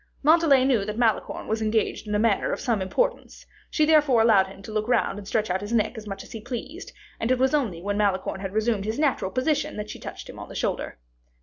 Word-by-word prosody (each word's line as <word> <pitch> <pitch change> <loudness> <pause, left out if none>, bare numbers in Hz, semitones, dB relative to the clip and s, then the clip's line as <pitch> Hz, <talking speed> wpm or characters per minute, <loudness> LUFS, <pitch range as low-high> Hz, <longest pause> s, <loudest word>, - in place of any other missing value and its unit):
Montalais 300 -4 +5
knew 250 -7 +2
that 210 +1 -5
Malicorne 230 -3 0
was 220 +1 -1
engaged 220 0 0
in 210 - -1
a - - +3
matter 215 -1 +2
of - - -2
some 235 -7 0
importance; - - -2 0.2
she 310 - +2
therefore 300 -6 +4
allowed 205 -4 +5
him 195 +1 -13
to 215 - -8
look 215 +1 -2
and 205 -5 0
stretch 215 -2 0
out 190 +1 -1
his 205 +2 -6
neck 230 +2 +1
as 220 -1 -8
much 195 -1 -6
as - - -15
he 225 - -7
pleased; 260 - -7 0.3
and 225 - -1
it 255 - +3
was 265 +3 +2
only 215 - 0
when 205 +1 -1
Malicorne 195 -2 0
had 195 -1 -4
resumed 220 -2 0
his 220 +1 -2
natural 280 -10 +1
position, 290 +5 -1
that 210 0 -5
she - - -9
touched - - -8
him - - -10
on - - -9
the - - -10
shoulder. - - -2
220 Hz, 240 wpm, -25 LUFS, 205-260 Hz, 0.3 s, Montalais